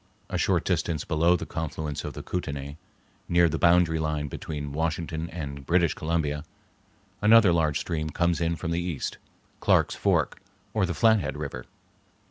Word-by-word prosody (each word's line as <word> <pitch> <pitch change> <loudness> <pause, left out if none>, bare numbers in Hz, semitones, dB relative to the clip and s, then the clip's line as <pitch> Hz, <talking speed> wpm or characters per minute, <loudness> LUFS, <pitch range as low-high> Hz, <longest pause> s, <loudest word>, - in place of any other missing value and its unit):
A - - 0
short - - +1
distance 80 -4 0
below 85 +2 +3
the - - -3
confluence 80 -2 -4
of - - -5
the - - -7
Kootenay, 70 -5 -4 0.5
near 85 0 +5
the 80 - -2
boundary 85 -1 +4
line 75 -2 -1
between 75 0 -5
Washington 80 +1 -2
and 70 -4 -6
British 85 +1 +2
Columbia, 75 -2 -1 0.8
another 105 -3 +6
large 80 -3 +1
stream 80 -2 -3
comes 85 0 0
in 85 0 +1
from 80 - -4
the 85 +1 0
east, 85 -5 -4 0.4
Clarke's - - +3
Fork, - - 0 0.3
or 105 -4 +1
the 85 - -3
Flathead 110 -10 +3
River. 70 -5 -6
80 Hz, 155 wpm, -27 LUFS, 75-85 Hz, 0.8 s, another